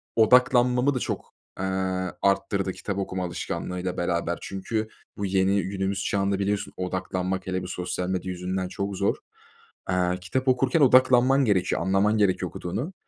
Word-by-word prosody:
Odaklanmamı 125 Hz, +3 st, +4 dB
da -, -, 0 dB
çok, -, -, -4 dB, 0.3 s
eee, 95 Hz, -, -1 dB, 0.6 s
arttırdı 100 Hz, 0 st, +1 dB
kitap 100 Hz, -2 st, -5 dB
okuma 95 Hz, -1 st, -3 dB
alışkanlığıyla 90 Hz, +1 st, -4 dB
beraber. 85 Hz, -1 st, -1 dB
Çünkü 110 Hz, +3 st, -3 dB, 0.3 s
bu 100 Hz, -, -2 dB
yeni 95 Hz, +1 st, +2 dB
günümüz 95 Hz, +1 st, -2 dB
çağında 100 Hz, -1 st, 0 dB
biliyorsun 100 Hz, +1 st, -1 dB
odaklanmak, 95 Hz, 0 st, -3 dB
hele 95 Hz, -1 st, -2 dB
bir -, -, -6 dB
sosyal 90 Hz, 0 st, -3 dB
medya 95 Hz, 0 st, -2 dB
yüzünden, 90 Hz, +1 st, -3 dB
çok 100 Hz, +2 st, -4 dB
zor. 100 Hz, -, +1 dB, 0.7 s
Aaa, 90 Hz, -1 st, +1 dB
kitap 110 Hz, +9 st, -3 dB
okurken 130 Hz, +4 st, +3 dB
odaklanman 130 Hz, 0 st, +5 dB
gerekiyor, 100 Hz, -5 st, +1 dB
anlaman 95 Hz, +4 st, +2 dB
gerekiyor 100 Hz, -3 st, +1 dB
okuduğunu. 125 Hz, -, -4 dB
95 Hz, 140 wpm, -25 LUFS, 90-110 Hz, 0.7 s, odaklanman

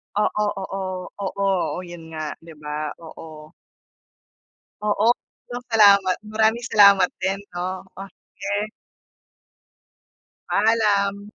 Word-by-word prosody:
Oo, 210 Hz, 0 st, +1 dB, 0.2 s
oo, 195 Hz, +1 st, -5 dB, 0.4 s
oo, 195 Hz, 0 st, -1 dB, 0.2 s
oh 180 Hz, -, -5 dB
'yun 165 Hz, -2 st, -10 dB
nga, 155 Hz, -1 st, -5 dB
'di 165 Hz, -1 st, -14 dB
ba? 150 Hz, 0 st, -4 dB
Oo. 155 Hz, -1 st, -11 dB, 1.3 s
Oo, 210 Hz, +1 st, +1 dB, 0.4 s
'yun 245 Hz, 0 st, -5 dB
salamat, 200 Hz, -4 st, +6 dB
maraming 220 Hz, +2 st, +1 dB
salamat 200 Hz, -3 st, +7 dB
din, 195 Hz, +1 st, 0 dB, 0.2 s
'no. 185 Hz, +2 st, -4 dB
Oh, 195 Hz, 0 st, -7 dB, 0.3 s
sige. 205 Hz, +1 st, -2 dB, 1.8 s
Paalam. 205 Hz, -2 st, +2 dB
200 Hz, 100 wpm, -23 LUFS, 175-210 Hz, 1.8 s, salamat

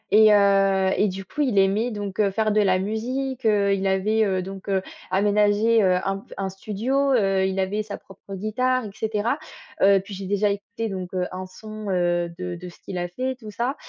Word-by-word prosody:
et 215 Hz, 0 st, +8 dB
heu 195 Hz, -1 st, +4 dB
et 210 Hz, -, +2 dB
du 190 Hz, 0 st, -5 dB
coup, 295 Hz, -, -4 dB
il 250 Hz, -8 st, +1 dB
aimait 200 Hz, +5 st, +3 dB
donc, 205 Hz, -2 st, -5 dB
heu, 205 Hz, -2 st, +4 dB
faire 215 Hz, +1 st, +1 dB
de 210 Hz, 0 st, +3 dB
la 190 Hz, -2 st, +3 dB
musique, 250 Hz, +6 st, -3 dB
heu, 200 Hz, -2 st, +3 dB
il 195 Hz, 0 st, 0 dB
avait, 205 Hz, +3 st, +2 dB
heu, 190 Hz, -2 st, 0 dB
donc, 195 Hz, +1 st, -8 dB
heu, 190 Hz, -1 st, +1 dB, 0.3 s
aménagé, 210 Hz, +3 st, +3 dB
heu, 185 Hz, -1 st, +4 dB
un 195 Hz, 0 st, -1 dB
pf -, -, -14 dB
un 195 Hz, -1 st, -2 dB
studio, 240 Hz, +8 st, -1 dB
heu, 195 Hz, -5 st, +2 dB
il 190 Hz, 0 st, -2 dB
avait 195 Hz, +3 st, 0 dB
sa 205 Hz, -1 st, -6 dB
propre 195 Hz, 0 st, -11 dB
guitare, 250 Hz, +5 st, 0 dB
et 205 Hz, -, -7 dB
cetera. 220 Hz, +4 st, -1 dB, 0.4 s
Heu, 195 Hz, 0 st, +6 dB
puis 195 Hz, +2 st, -10 dB
j'ai 195 Hz, 0 st, -6 dB
déjà 205 Hz, +1 st, +2 dB
écouté 205 Hz, +3 st, -4 dB
donc, 185 Hz, -2 st, -6 dB
heu, 180 Hz, -1 st, 0 dB
un 185 Hz, +1 st, -5 dB
son, 215 Hz, +2 st, -8 dB
heu, 175 Hz, -2 st, +1 dB
de 180 Hz, -1 st, -4 dB
de 180 Hz, +1 st, -8 dB
ce 175 Hz, -, -16 dB
qu'il 185 Hz, -, -7 dB
a 175 Hz, -, -2 dB
fait, 255 Hz, +9 st, -3 dB
tout 215 Hz, -3 st, -9 dB
ça. 240 Hz, +6 st, -2 dB
200 Hz, 220 wpm, -24 LUFS, 190-220 Hz, 0.4 s, et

